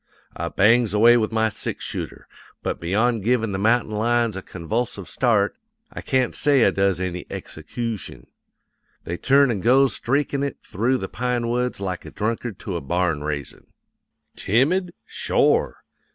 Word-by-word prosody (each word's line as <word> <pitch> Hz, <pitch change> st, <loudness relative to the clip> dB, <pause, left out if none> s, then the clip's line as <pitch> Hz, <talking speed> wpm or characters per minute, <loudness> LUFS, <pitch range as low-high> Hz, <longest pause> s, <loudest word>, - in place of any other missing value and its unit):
I -, -, -3 dB
bangs 110 Hz, +1 st, +3 dB
away 115 Hz, +3 st, +7 dB
with 110 Hz, -1 st, 0 dB
my 110 Hz, 0 st, +2 dB
six 105 Hz, -, -4 dB
shooter, -, -, -6 dB, 0.4 s
but -, -, -2 dB
beyond 110 Hz, +5 st, +1 dB
givin' 115 Hz, -1 st, +1 dB
the 95 Hz, -, -2 dB
mountain 115 Hz, +2 st, +2 dB
lions 115 Hz, 0 st, +1 dB
a 95 Hz, -, -4 dB
convulsive 100 Hz, +3 st, -4 dB
start 110 Hz, -5 st, +1 dB, 0.4 s
I -, -, -6 dB
can't 130 Hz, -2 st, 0 dB
say 140 Hz, -5 st, +3 dB
I -, -, +4 dB
does 95 Hz, -2 st, +1 dB
any 90 Hz, -1 st, -3 dB
execootion. 110 Hz, +7 st, -6 dB, 0.8 s
They 85 Hz, -, -4 dB
turns 140 Hz, +3 st, +4 dB
an' 105 Hz, -, -2 dB
goes 130 Hz, +4 st, +4 dB
streakin' 140 Hz, +2 st, 0 dB
it 140 Hz, 0 st, -2 dB
through 120 Hz, +7 st, 0 dB
the 95 Hz, -, -4 dB
pine 120 Hz, +1 st, -2 dB
woods 125 Hz, -1 st, -1 dB
like 95 Hz, -2 st, -4 dB
a -, -, -9 dB
drunkard 110 Hz, -1 st, -3 dB
to 95 Hz, -, -4 dB
a -, -, -5 dB
barn 85 Hz, 0 st, -1 dB
raisin'. 75 Hz, -2 st, -5 dB, 0.7 s
"Timid? 170 Hz, -, +1 dB
Shore! 450 Hz, +1 st, +1 dB
115 Hz, 155 wpm, -23 LUFS, 95-125 Hz, 0.8 s, away